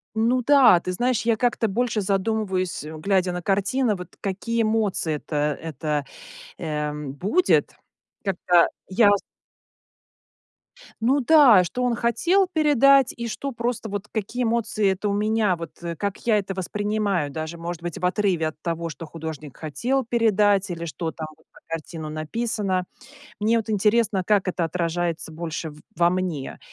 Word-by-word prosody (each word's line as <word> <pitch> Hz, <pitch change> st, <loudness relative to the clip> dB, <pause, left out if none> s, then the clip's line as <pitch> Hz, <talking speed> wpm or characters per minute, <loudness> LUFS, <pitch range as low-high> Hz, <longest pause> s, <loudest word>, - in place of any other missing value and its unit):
Ну 240 Hz, +3 st, +2 dB
да, 265 Hz, -9 st, +6 dB
ты 180 Hz, +1 st, -4 dB
знаешь, 245 Hz, +4 st, 0 dB
я 230 Hz, -1 st, +2 dB
как-то 235 Hz, -2 st, +1 dB
больше 220 Hz, +1 st, 0 dB
задумываюсь, 195 Hz, -4 st, -1 dB
э, 155 Hz, -, -8 dB
глядя 185 Hz, +1 st, +1 dB
на 180 Hz, -, -3 dB
картины, 205 Hz, +5 st, +1 dB
вот 180 Hz, -2 st, -10 dB
какие 220 Hz, +4 st, -2 dB
эмоции 215 Hz, -7 st, 0 dB
это 150 Hz, 0 st, -2 dB
это, 150 Hz, -2 st, -3 dB, 0.5 s
эм, 150 Hz, -2 st, -3 dB
будет, 210 Hz, -, +1 dB, 0.5 s
когда 180 Hz, -3 st, +3 dB, 0.2 s
я 205 Hz, +2 st, +4 dB
с -, -, -4 dB, 1.8 s
Ну 260 Hz, +5 st, +3 dB
да, 250 Hz, -, +7 dB
что 250 Hz, +8 st, -3 dB
он 245 Hz, -1 st, +1 dB
хотел 345 Hz, -, +2 dB
передать, 275 Hz, -4 st, +5 dB
и 235 Hz, 0 st, -4 dB
что 275 Hz, +5 st, -4 dB
просто 235 Hz, -1 st, -3 dB
вот 205 Hz, 0 st, -5 dB
какие 225 Hz, +4 st, -3 dB
эмоции 225 Hz, -3 st, +1 dB
это 200 Hz, +2 st, -3 dB
у 200 Hz, -, 0 dB
меня, 210 Hz, -2 st, +1 dB
вот, 165 Hz, 0 st, -10 dB
э, 170 Hz, -1 st, -4 dB
как 200 Hz, +4 st, -3 dB
я 220 Hz, -2 st, +4 dB
это 195 Hz, -1 st, -4 dB
воспринимаю, 200 Hz, -3 st, -1 dB
даже, 160 Hz, +3 st, -5 dB
может 170 Hz, 0 st, -5 dB
быть, 175 Hz, -2 st, -5 dB
в 180 Hz, -, -6 dB
отрыве 180 Hz, -5 st, +1 dB
от 155 Hz, -, -10 dB
того, 170 Hz, -1 st, -2 dB
что 165 Hz, +1 st, -8 dB
художник 155 Hz, -3 st, -8 dB
хотел 240 Hz, -, -1 dB
передать, 210 Hz, -4 st, +2 dB
или 170 Hz, -1 st, -4 dB
что 160 Hz, +1 st, -4 dB
там 160 Hz, -1 st, -6 dB
на 160 Hz, -, -27 dB, 0.2 s
этой -, -, -27 dB
картине 165 Hz, -1 st, -5 dB
написано. 185 Hz, +4 st, -2 dB, 0.6 s
Мне 225 Hz, +2 st, +3 dB
вот 220 Hz, -1 st, -4 dB
интересно, 210 Hz, -1 st, +2 dB
как 200 Hz, -1 st, +2 dB
это 175 Hz, -1 st, -1 dB
отражается 170 Hz, -1 st, -2 dB
больше 160 Hz, 0 st, -5 dB
в 150 Hz, -, -15 dB, 0.2 s
во 170 Hz, +1 st, +4 dB
мне. 180 Hz, -6 st, -3 dB
195 Hz, 160 wpm, -24 LUFS, 165-225 Hz, 1.8 s, да